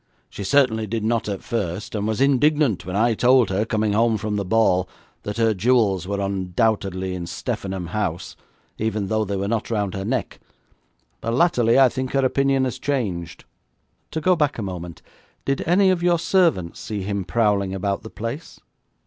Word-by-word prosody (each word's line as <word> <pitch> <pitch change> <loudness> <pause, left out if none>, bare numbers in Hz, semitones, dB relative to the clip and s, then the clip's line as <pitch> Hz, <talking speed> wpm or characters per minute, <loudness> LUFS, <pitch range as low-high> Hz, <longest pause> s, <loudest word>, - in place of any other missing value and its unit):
'She 100 - -6
certainly 110 0 +2
did 110 +1 -3
not 115 0 0
at 100 -2 -4
first, 100 -3 -3
and 105 -1 -2
was 110 0 -1
indignant 140 - +2
when 90 - -4
I 115 +3 +3
told 125 -1 +4
her, 100 +3 0
coming 110 -2 0
home 115 +1 +2
from 105 -1 -3
the 100 - -1
ball, 90 -3 +2 0.3
that 105 +1 -5
her 115 -1 +3
jewels 100 -3 +2
were 100 0 -2
undoubtedly 95 0 -1
in 90 -2 -5
Steffenham 95 0 -4
House, 90 -4 -3 0.4
even 110 -3 -1
though 110 0 +1
they 100 -1 -3
were 100 +1 -2
not 115 0 -2
round 105 -5 -1
her 95 - -4
neck, 120 +2 -3 0.8
but 115 +1 -2
latterly 125 -6 +3
I 135 -1 +7
think 130 +1 -4
her 135 -1 +2
opinion 135 0 +2
has 130 -3 -2
changed.' 95 -12 -3 0.6
'To 160 - -4
go 185 +3 +4
back 150 -3 0
a 110 - -3
moment. 90 -4 -7 0.4
Did 135 0 0
any 190 +3 +4
of 180 -2 0
your 175 -1 +3
servants 165 - +1
see 105 -3 -4
him 100 0 -2
prowling 100 -1 +1
about 100 +3 -2
the 110 - -9
place?' 115 +10 -6
110 Hz, 185 wpm, -22 LUFS, 95-125 Hz, 0.8 s, I